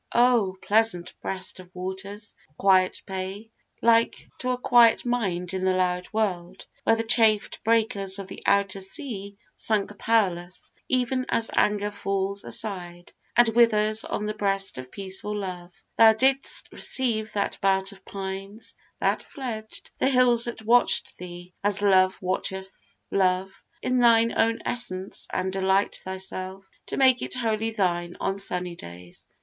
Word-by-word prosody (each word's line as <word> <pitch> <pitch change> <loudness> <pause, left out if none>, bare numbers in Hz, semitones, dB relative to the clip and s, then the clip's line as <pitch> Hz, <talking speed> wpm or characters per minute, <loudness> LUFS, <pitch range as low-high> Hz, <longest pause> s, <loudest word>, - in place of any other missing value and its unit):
Oh! 235 -6 +3
pleasant 210 -5 +2
breast 190 0 -2
of 180 -1 -12
waters, 195 +3 -6 0.2
quiet 185 -1 +3
bay, 190 +3 -6 0.3
Like 230 0 +3
to 255 - -3
a 250 - 0
quiet 240 -2 +4
mind 190 -7 -1
in 190 0 -2
the 185 0 +2
loud 180 -1 0
world, 190 -4 -2 0.2
Where 225 - +4
the 225 - -2
chafed 225 -2 +3
breakers 215 -4 +1
of 195 -1 -7
the - - -10
outer 200 -1 +2
sea 200 -1 -4 0.2
Sunk 210 -1 0
powerless, 185 -6 0 0.2
even 255 0 0
as 230 - 0
anger 210 0 +1
falls 195 0 -2
aside, 175 -4 -3 0.2
And 240 -1 +6
withers 215 -2 +3
on 210 - -3
the 215 - -2
breast 195 -6 -1
of 130 0 -9
peaceful 200 +1 -3
love, 180 -3 -6 0.3
Thou 225 -1 +8
didst 265 +4 +1
receive 220 -4 +1
that 200 -1 -2
belt 195 0 +2
of 195 -1 -16
pines, 195 +2 -7 0.3
that - - +1
fledged 230 -7 -7
The 265 - +3
hills 250 -3 +4
that 235 -2 -5
watch'd 240 +2 +3
thee, 175 0 -10
as 205 0 +3
Love 190 -1 +4
watcheth 185 - -5
Love, 190 0 0 0.2
In 255 0 +1
thine 230 -1 +5
own 225 0 +1
essence, 195 -6 -2
and 190 0 -2
delight 190 +1 +1
thyself 190 0 -6 0.2
To - - -4
make 260 -2 +4
it - - -4
wholly 225 -2 -1
thine 175 -5 -1
on 195 +1 -2
sunny 180 -2 -3
days. 90 - -11
200 Hz, 145 wpm, -25 LUFS, 185-225 Hz, 0.3 s, Thou